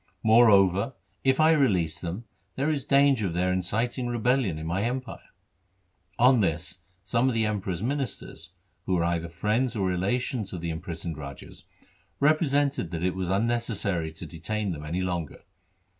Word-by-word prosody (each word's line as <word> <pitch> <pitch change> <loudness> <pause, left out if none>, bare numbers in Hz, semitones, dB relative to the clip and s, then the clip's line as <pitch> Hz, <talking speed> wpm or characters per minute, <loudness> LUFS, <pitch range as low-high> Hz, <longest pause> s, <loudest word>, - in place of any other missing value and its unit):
Moreover, 110 -1 +5 0.3
if 135 +1 +2
I 155 +1 +6
release 90 - +2
them, 90 +7 -5 0.3
there 140 +4 0
is 140 -3 -2
danger 140 -7 +4
of 85 - -4
their 90 +1 +1
inciting 115 +7 -1
rebel 120 +2 +2
lion 100 - -1
in 80 - -6
my 85 +4 -1
empire.' 125 +2 -4 0.9
On 125 +1 +5
this 85 0 -2 0.2
some 115 +6 +1
of 125 - -2
the 110 -1 +2
Emperor's 95 -3 -2
ministers, 125 - -4 0.4
who 95 - +2
were 85 - +1
either 85 -1 -1
friends 110 +9 0
or 100 -3 0
relations 100 +5 -1
of 90 - -5
the 85 -1 -2
imprisoned 80 -1 -5
rajas, 70 -2 -10 0.5
represented 145 - +2
that 85 -1 -4
it 90 0 +1
was 95 -2 -3
unnecessary 100 -5 0
to 85 - -8
detain 95 +6 -3
them 75 -2 -6
any 85 +4 -2
longer. 85 -4 -4
100 Hz, 160 wpm, -27 LUFS, 85-125 Hz, 0.9 s, I